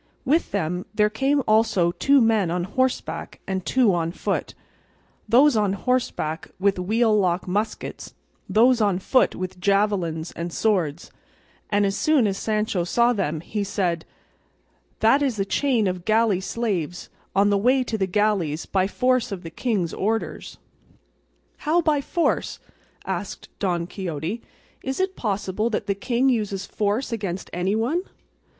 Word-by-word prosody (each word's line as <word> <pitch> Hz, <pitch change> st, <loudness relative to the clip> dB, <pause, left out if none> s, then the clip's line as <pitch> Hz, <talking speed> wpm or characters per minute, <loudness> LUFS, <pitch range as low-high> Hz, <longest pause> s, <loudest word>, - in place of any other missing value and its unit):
With 310 Hz, +6 st, +2 dB
them 180 Hz, -1 st, -2 dB
there 210 Hz, 0 st, +3 dB
came 270 Hz, +5 st, +1 dB
also 215 Hz, -5 st, +3 dB
two 275 Hz, +9 st, +3 dB
men 220 Hz, -6 st, +3 dB
on 175 Hz, +1 st, -1 dB
horseback 260 Hz, +7 st, -2 dB
and 190 Hz, -1 st, -2 dB
two 245 Hz, -3 st, +3 dB
on 165 Hz, -1 st, 0 dB
foot; -, -, -3 dB, 0.7 s
those 265 Hz, +3 st, +6 dB
on 205 Hz, -3 st, +2 dB
horseback 200 Hz, -8 st, -1 dB
with 195 Hz, -1 st, +2 dB
wheel 220 Hz, +4 st, +2 dB
lock 185 Hz, -3 st, +1 dB
muskets, 210 Hz, +4 st, -3 dB, 0.3 s
those 240 Hz, +2 st, +4 dB
on 200 Hz, -4 st, +2 dB
foot 255 Hz, +7 st, +2 dB
with 185 Hz, 0 st, -5 dB
javelins 185 Hz, -5 st, 0 dB
and 170 Hz, +1 st, -5 dB
swords, 175 Hz, -7 st, 0 dB, 0.6 s
and 205 Hz, 0 st, +2 dB
as 195 Hz, 0 st, 0 dB
soon 305 Hz, -6 st, +3 dB
as 195 Hz, -1 st, -1 dB
Sancho 215 Hz, -4 st, 0 dB
saw 235 Hz, +7 st, +3 dB
them 160 Hz, -8 st, -2 dB
he 205 Hz, +4 st, -3 dB
said: 175 Hz, -4 st, -1 dB, 1.0 s
"That 230 Hz, +6 st, +5 dB
is 260 Hz, -7 st, 0 dB
a 195 Hz, -, +1 dB
chain 240 Hz, +1 st, +1 dB
of 180 Hz, -2 st, -2 dB
galley 215 Hz, -2 st, +2 dB
slaves, 190 Hz, -6 st, -3 dB, 0.2 s
on 200 Hz, +1 st, +4 dB
the -, -, +3 dB
way 255 Hz, +5 st, +3 dB
to 235 Hz, -, -3 dB
the 195 Hz, -3 st, 0 dB
galleys 190 Hz, -6 st, 0 dB
by 190 Hz, -1 st, +1 dB
force 255 Hz, +2 st, +1 dB
of 190 Hz, -3 st, -5 dB
the 165 Hz, -, -7 dB
king's 195 Hz, -6 st, -1 dB
orders." 220 Hz, +2 st, -3 dB, 1.0 s
"How 320 Hz, +3 st, +1 dB
by 310 Hz, -4 st, +2 dB
force?" 335 Hz, +4 st, -1 dB, 0.5 s
asked 190 Hz, +1 st, -5 dB
Don 175 Hz, -4 st, 0 dB
Quixote; 180 Hz, +3 st, -4 dB, 0.4 s
"is 265 Hz, +1 st, -4 dB
it 375 Hz, 0 st, 0 dB
possible 210 Hz, 0 st, -1 dB
that 215 Hz, -2 st, -2 dB
the 200 Hz, -, +1 dB
king 245 Hz, +5 st, 0 dB
uses 210 Hz, -6 st, 0 dB
force 215 Hz, +6 st, -1 dB
against 195 Hz, -5 st, -4 dB
anyone?" 220 Hz, -, 0 dB
205 Hz, 150 wpm, -24 LUFS, 185-235 Hz, 1.0 s, those